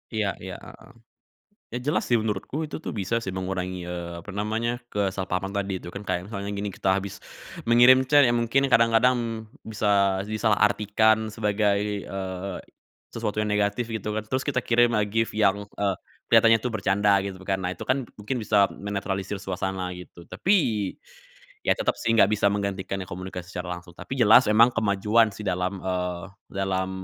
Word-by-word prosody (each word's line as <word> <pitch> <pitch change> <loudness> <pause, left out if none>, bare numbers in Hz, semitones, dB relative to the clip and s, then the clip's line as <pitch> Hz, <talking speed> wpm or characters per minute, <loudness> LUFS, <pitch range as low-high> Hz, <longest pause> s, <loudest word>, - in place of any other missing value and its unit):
Iya 110 -2 +1 0.2
iya, 95 -1 -6
heeh. - - -14 0.8
Ya, - - -3
jelas 150 - +1
sih 120 - +4
menurutku, 110 +4 -3
itu - - -5
tuh - - -4
bisa 95 +4 -2
sih 95 - -4
mengurangi, 95 -1 -3
eee, 85 -1 -5
apa 95 - -10
namanya, 110 +3 -1 0.2
kesalahpahaman 95 -1 -2
tadi 100 -1 -1
itu, - - -9
kan. 100 - -6
Kayak 90 - -1
misalnya 100 -1 -5
gini, 105 +1 -2
kita - - -1
habis 100 -1 -4 0.5
mengirim 120 +2 +7
chat, 145 +1 +6
ya - - +2
mungkin 120 +4 +2
kadang-kadang 115 +2 +5 0.5
bisa 105 -1 -1 0.4
disalahartikan 110 0 +2
sebagai, 105 -1 +1 0.3
eee, 95 -1 -5 0.6
sesuatu 105 -2 -2
yang 105 - -1
negatif 105 +3 0
gitu 110 -2 -3
kan, 110 - -1
terus 130 +2 -1
kita 145 - 0
kirim 120 0 +3
lah 105 - +2
GIF 115 +2 0
yang, 105 -2 +3
eee, 100 -1 -2 0.3
kelihatannya 115 0 +6
tuh 125 - -2
bercanda 100 0 +2
gitu 95 -1 -6
kan, 95 - +2
nah 90 -1 -3
itu 90 - -12
kan 130 +1 +1 0.2
mungkin 115 +6 -3
bisa 105 -4 +3
menetralisir 100 -1 -4
suasana, 95 -1 -3
gitu. 90 -1 -13
Tapi, 190 - 0 1.1
ya - - +4
tetap - - 0
sih, 115 - +1
enggak 110 -4 +5
bisa 100 -1 +3
menggantikan 100 -1 -3
yang 95 - -7
komunikasi 90 0 -7
secara 90 0 -4
langsung, 90 0 -13
tapi - - -10
jelas 115 +3 +7
emang 115 +3 +7
kemajuan 110 +1 +2
sih 100 - -12
dalam, 90 +1 -2
eee, 90 -2 -3 0.3
dalam, 95 -1 -1
100 Hz, 170 wpm, -25 LUFS, 95-110 Hz, 1.1 s, mengirim